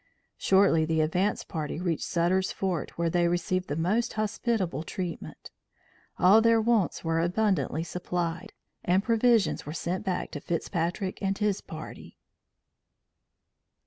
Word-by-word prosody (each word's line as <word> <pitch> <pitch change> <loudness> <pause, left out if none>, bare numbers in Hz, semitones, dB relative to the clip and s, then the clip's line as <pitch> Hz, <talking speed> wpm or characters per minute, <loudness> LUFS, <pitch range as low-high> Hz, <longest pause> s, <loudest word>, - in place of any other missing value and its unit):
Shortly 190 -4 +4
the 160 0 +1
advance 180 +6 0
party 155 -2 -4
reached 175 -3 -1
Sutter's 180 +2 +1
Fort 185 -4 -3
where 170 -1 0
they 175 0 +2
received 175 +1 -1
the 145 - -2
most 205 +9 0
hospitable 215 - -1
treatment. 175 +1 -6 0.7
All 200 +5 +6
their 230 0 +4
wants 220 -4 +1
were 165 0 0
abundantly 170 -4 0
supplied, 175 0 -3 0.3
and 185 +2 +2
provisions 230 -1 +2
were 150 - -4
sent 175 +2 -3
back 185 -2 -2
to 145 - -5
Fitzpatrick 175 +3 -2
and 195 -1 0
his 210 -2 0
party. 155 -1 -10
180 Hz, 130 wpm, -28 LUFS, 165-200 Hz, 0.7 s, All